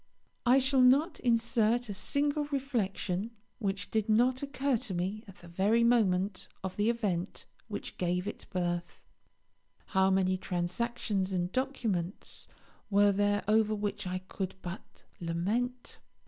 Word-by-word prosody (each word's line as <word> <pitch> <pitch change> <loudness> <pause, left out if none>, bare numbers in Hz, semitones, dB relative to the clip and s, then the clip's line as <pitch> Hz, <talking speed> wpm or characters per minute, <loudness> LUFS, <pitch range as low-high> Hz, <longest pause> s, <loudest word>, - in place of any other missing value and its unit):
I 250 +2 +7
shall 265 0 +3
not 280 +7 +4
insert 235 0 +2
a 205 - -4
single 290 +8 0
reflection 230 -8 -2 0.3
which 200 -2 -2
did 220 -1 0
not 245 +4 +3
occur 280 -1 0
to 220 -5 -4
me 190 +5 -2
at 195 - -12
the 175 - -12
very 200 +7 +2
moment 200 -5 +2 0.2
of 190 -1 -4
the 210 +2 +2
event 200 -6 -2 0.2
which - - -6
gave 180 +1 0
it 210 - -6
birth. 175 -2 -3 0.8
How 190 -1 +3
many 185 -1 +2
transactions 190 +2 -2
and 180 0 -1
documents 225 -9 -2 0.4
were 205 0 +5
there 205 +1 +1
over 215 0 +3
which 205 -1 -3
I 185 0 -3
could 190 -1 -4
but 180 +1 -8 0.2
lament! 210 +10 -2
205 Hz, 135 wpm, -31 LUFS, 185-240 Hz, 0.8 s, I